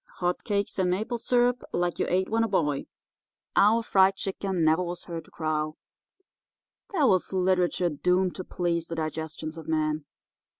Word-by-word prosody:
'Hot 180 0 -1
Cakes 200 -3 -1
and 185 -1 +2
Maple 220 +6 -1
Syrup 245 +1 +2
Like 175 0 -1
You - - +1
Ate 185 +1 +1
When 225 +1 +2
a - - +1
Boy,' 150 -9 0 0.7
'Our 220 +3 +5
Fried 195 -2 +4
Chicken 190 -2 -2
Never 160 +3 +4
Was 175 -1 -4
Heard 165 -2 -6
to - - -18
Crow'— 155 -1 -2 1.1
there 330 -8 +2
was 185 -7 +2
literature 180 -1 +2
doomed 180 +4 +1
to 185 - -4
please 170 -2 -1
the 165 - -4
digestions 160 0 -4
of 160 - -11
man! 155 -1 0
180 Hz, 165 wpm, -27 LUFS, 160-195 Hz, 1.1 s, Our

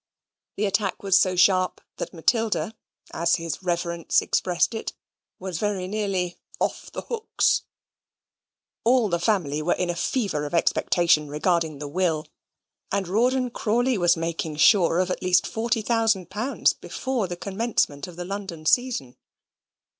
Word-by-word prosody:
The 210 - +1
attack 195 -1 -1
was 195 -2 +3
so 185 -1 +2
sharp 185 0 +3 0.2
that - - -4
Matilda 205 0 0 0.4
as 170 +1 +2
his 165 0 -4
Reverence 170 -2 0
expressed 180 +5 0
it 225 - -4 0.4
was 185 -3 -5
very 200 -3 -1
nearly 190 -4 -2 0.2
"off - - -2
the - - -6
hooks"; 455 -2 +1 1.2
all 240 -2 +3
the 170 -1 0
family 170 -7 0
were 170 +3 +1
in 180 -1 -1
a - - -5
fever 170 - -1
of 170 - -4
expectation 170 -2 +2
regarding 160 +1 0
the 145 +1 -6
will, 160 -1 0 0.7
and 195 -2 -1
Rawdon 250 +6 +1
Crawley 240 +4 +1
was 175 -3 +3
making 165 -1 -3
sure 170 +2 +5
of 185 0 +1
at - - -3
least 185 0 +3
forty 225 -1 -1
thousand 225 -6 +1
pounds 225 +8 +1
before 255 -7 -3
the 175 0 -5
commencement 195 -8 -1
of 180 - -11
the 175 +1 -6
London 190 -5 -6
season. 225 - +1
185 Hz, 145 wpm, -25 LUFS, 170-215 Hz, 1.2 s, sure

